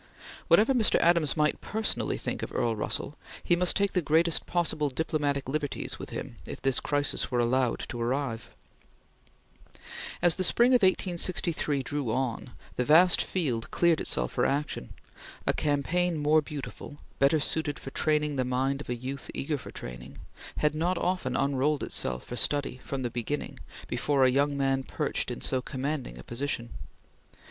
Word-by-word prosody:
Whatever 225 +6 +5
Mr. 235 -4 +2
Adams 170 -4 +3
might 150 0 +1
personally 220 +1 -1
think - - -4
of - - -5
Earl 115 -2 0
Russell, 140 +6 -3 0.2
he 175 - +3
must 180 0 +3
take 200 0 +1
the 180 - +2
greatest 165 +2 +2
possible 160 -4 0
diplomatic 145 -1 -1
liberties 145 +1 -3
with - - -7
him - - -6
if - - -6
this 135 0 +2
crisis 145 -1 0
were 125 - -1
allowed 120 0 +1
to 120 - -5
arrive. 125 -1 -2 1.7
As 175 -1 +4
the 185 - 0
spring 240 +7 +5
of 250 -2 +5
1863 175 -6 +1
drew 140 -3 -2
on, 130 0 -2 0.3
the 125 - +2
vast 165 +6 +7
field 125 -11 -2
cleared 170 -2 +2
itself - - 0
for - - 0
action. 140 - -2 0.5
A - - +3
campaign 165 +4 0
more 150 +1 +3
beautiful 145 0 -8 0.2
better 140 +3 +4
suited 150 0 0
for 135 - -9
training 150 -1 +1
the 130 - +2
mind 130 +2 -1
of - - -10
a 125 - -1
youth 130 +3 -6
eager 145 +1 -2
for - - -10
training 60 +2 -9 0.4
has 150 0 +2
not 170 +4 0
often 180 -9 -1
unrolled 140 +2 +1
itself 60 -1 -1
for 120 - -6
study, 140 +1 +1
from 135 -1 -4
the 120 - -2
beginning, 120 +5 -4 0.3
before 140 -2 +1
a 130 - +4
young 140 +2 +1
man 135 -1 +1
perched - - -2
in - - -5
so 130 -1 0
commanding 135 - -4
a - - -10
position. 120 -1 -4
145 Hz, 165 wpm, -28 LUFS, 130-160 Hz, 1.7 s, vast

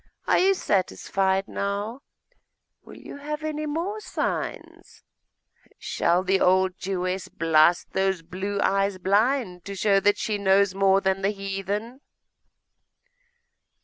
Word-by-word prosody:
Are - - +4
you 385 +1 +4
satisfied 195 - 0
now? 205 +6 -3 0.8
Will - - -14
you - - -10
have 300 +2 -5
any 305 0 -3
more 345 +8 -3
signs? - - -5 0.7
Shall 175 +2 0
the 190 0 +2
old 185 0 +3
Jewess 185 0 -3
blast 165 +1 +2
those 190 -3 0
blue 195 +4 -4
eyes 195 0 +1
blind 200 0 +1
to 200 - -6
show 195 0 +3
that 205 +1 +2
she 210 -2 -2
knows 195 0 +3
more 195 0 +3
than 190 0 0
the 195 - +1
heathen? 200 +5 -4
195 Hz, 120 wpm, -25 LUFS, 190-215 Hz, 0.8 s, Are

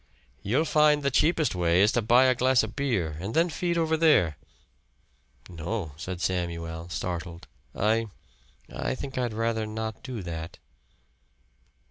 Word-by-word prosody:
"You'll 130 +11 +1
find 150 -1 +3
the 140 - +1
cheapest 155 +3 +2
way 90 -1 +2
is 105 - +4
to 120 - +1
buy 120 +4 +5
a 130 - +5
glass 130 -1 +3
of 110 -1 -6
beer 95 - -1
and 100 +6 -5
then 170 +1 +3
feed 170 +2 -1
over 160 -1 +2
there." 150 - +4 1.1
"No," 85 +1 -4
said 90 +2 -6
Samuel, 85 -2 -3
startled. 85 -1 -5 0.3
"I 110 +2 +1 0.7
I - - -2
think 130 0 -5
I'd 120 -2 -1
rather 110 0 -1
not 110 0 -5
do 125 -7 -6
that." 80 -1 -6
110 Hz, 145 wpm, -27 LUFS, 85-130 Hz, 1.1 s, buy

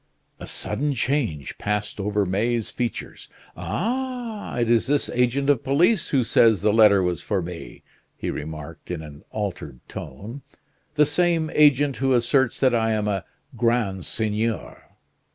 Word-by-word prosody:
A - - -8
sudden 145 0 -1
change 115 - -1
passed 105 +1 -2
over 105 0 0
May's 110 +5 0
features. 120 -4 -5 0.3
"Ah! 230 - -3
it 120 -1 +1
is 115 +1 +3
this 145 +1 +1
agent 125 +3 +1
of 145 -5 +3
police 165 +9 +2
who 135 -3 +2
says 110 -3 +4
the 105 -1 +3
letter 105 -3 +6
was 90 -1 -1
for 100 - -1
me," 85 -1 -8 0.3
he - - -3
remarked 75 -1 -8
in 85 -3 -4
an 75 -1 -11
altered 90 - -5
tone. 105 - -8 0.5
"The 150 0 +5
same 165 0 +1
agent 145 -2 +4
who 135 0 +1
asserts 120 +1 +2
that 130 -2 +4
I 115 -1 +2
am 105 -1 -1
a 100 -3 -1 0.3
grand 115 -6 0
seigneur." 110 +1 -2
115 Hz, 150 wpm, -24 LUFS, 100-140 Hz, 0.5 s, letter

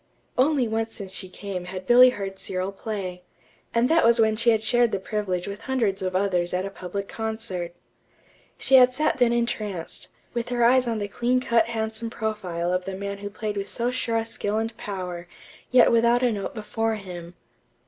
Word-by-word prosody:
Only 265 -1 +3
once 225 0 -2
since 195 -2 -6
she 185 0 -3
came 185 -2 -6
had 185 +1 -6
Billy 250 +4 +8
heard 195 -5 -5
Cyril 185 +1 -2
play, 195 -3 -5 0.5
and 235 +1 +3
that 330 +3 +4
was 235 +1 +5
when 220 -1 +4
she 230 +2 +2
had 220 -1 +3
shared 240 0 +3
the - - 0
privilege 190 -3 -2
with 200 +1 -6
hundreds 225 -7 0
of 185 -1 -2
others 180 -2 +1
at 185 +1 -1
a 195 - -5
public 195 +1 -5
concert. 220 -6 -4 0.8
She 265 - +5
had 250 0 +6
sat 305 -2 +1
then 245 -1 +4
entranced, 215 -7 -2 0.3
with 235 0 -2
her 245 -1 +1
eyes 255 +1 +5
on 230 -1 0
the 205 -1 -2
clean 245 +5 +1
cut 230 -3 +2
handsome 220 0 -3
profile 185 -7 -2
of 180 0 -1
the 195 - -4
man 200 +1 -5
who 205 0 -5
played 210 0 -4
with 200 0 -3
so 240 +1 -1
sure 230 -2 -1
a 225 - 0
skill 215 -2 -2
and 225 +1 -2
power, 180 -4 -5 0.4
yet 250 -1 +6
without 235 +1 +4
a 245 - +3
note 205 0 -4
before 225 +1 -1
him. 180 -4 -8
215 Hz, 200 wpm, -25 LUFS, 190-235 Hz, 0.8 s, Billy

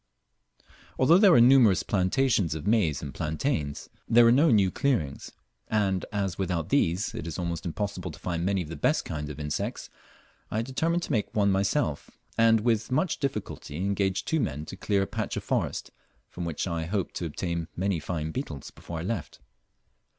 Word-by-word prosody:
Although 160 +8 +6
there 200 -2 +7
were 165 - +7
numerous 120 -5 +6
plantations 100 - +1
of 80 - -6
maize 95 -10 +2
and 70 - -6
plantains, 75 - -2 0.2
there 120 +1 +7
were 115 - +6
no 145 +6 +5
new 100 -6 +4
clearings; 100 - -1 0.4
and 100 -4 0
as 100 -4 -2
without 90 -4 -1
these 95 -8 +1
it - - -5
is 80 - -5
almost 85 -1 -3
impossible 95 0 -3
to 80 - -9
find 85 -2 -3
many 95 0 +1
of 75 - -11
the 80 - -5
best 75 - +1
kinds 75 -2 -4
of 75 0 -8
insects, 75 0 -4 0.6
I 110 +2 -1
determined 165 +7 0
to - - -4
make 105 -3 -1
one 100 -2 +3
myself, 100 - 0 0.3
and 115 -1 +4
with 115 +1 0
much 155 +6 +1
difficulty 130 - -4
engaged 95 +1 -1
two 160 - +1
men 75 - -2
to - - -8
clear 100 -1 0
a - - -1
patch - - -3
of - - -4
forest, - - -2 0.4
from 90 - -5
which 80 -3 -2
I 85 -3 -2
hoped 95 +2 -2
to 85 - -3
obtain 85 +1 -3
many 95 -1 0
fine 80 -1 -3
beetles 80 - -5
before 85 - -8
I 80 - -4
left. 90 - -4
95 Hz, 185 wpm, -27 LUFS, 80-115 Hz, 0.6 s, there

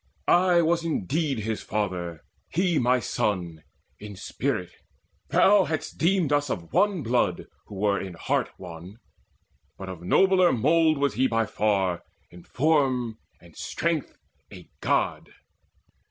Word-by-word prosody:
I 175 -1 +4
was 170 +1 +1
indeed 150 - -1
his 110 0 -3
father, 90 -6 -3 0.3
he 175 -1 +1
my 125 +1 +3
son 90 -8 -2 0.4
In 105 -1 -9
spirit: 90 -1 -3 0.6
thou 200 -1 +5
hadst 160 +1 -4
deemed 170 -3 +2
us 145 -1 +1
of 85 -6 -5
one 200 -6 +2
blood 115 -7 0 0.2
Who 105 - -10
were 100 0 +1
in 95 -2 -7
heart - - -1
one: 90 +1 -10 0.8
but 95 -1 -7
of 90 -3 -8
nobler 185 - +4
mould 155 +6 +3
Was 140 -1 +1
he 130 +5 +2
by 115 -1 +1
far, 100 -5 0 0.3
in 85 0 -13
form 130 -6 +1 0.2
and - - -18
strength 165 -3 -3 0.3
a - - -12
God. - - 0
125 Hz, 135 wpm, -26 LUFS, 95-160 Hz, 0.8 s, thou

